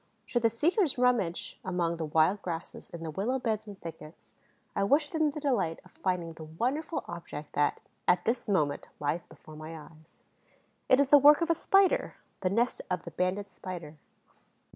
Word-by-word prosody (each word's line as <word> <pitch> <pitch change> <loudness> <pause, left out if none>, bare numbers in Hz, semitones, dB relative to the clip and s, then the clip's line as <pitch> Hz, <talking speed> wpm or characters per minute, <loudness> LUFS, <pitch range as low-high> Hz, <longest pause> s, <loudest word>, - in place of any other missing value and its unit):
Should 240 - 0
the 230 - +4
seekers 315 - +2
rummage 240 -9 +1
among 175 -2 -1
the 165 - -2
wild 160 +6 +3
grasses 170 -2 -6
in 170 -1 -8
the 160 - -4
willow 215 - -1
beds 220 -3 -2
and 200 -2 -9
thickets, 160 -1 -10 0.4
I 200 - +1
wish 290 +8 +3
them 315 -2 +2
the 295 - -5
delight 205 - 0
of - - -18
finding 180 -3 -2
the 160 0 -9
wonderful 255 - -2
object 165 -3 -7
that, 145 0 +1 0.3
at 180 0 +3
this 235 0 0
moment, 150 -8 +1
lies 150 +4 -2
before 155 0 -14
my 155 +1 -8
eyes. 155 +1 -17 0.7
It 255 - +6
is 280 -1 +2
the 290 - +10
work 295 +3 +7
of 335 0 +2
a - - +6
Spider, 390 +3 +3 0.2
the 185 - 0
nest 230 +5 +1
of 180 -2 -1
the - - -8
Banded 185 +3 -1
Spider. 170 -6 -8
190 Hz, 185 wpm, -30 LUFS, 165-255 Hz, 0.7 s, the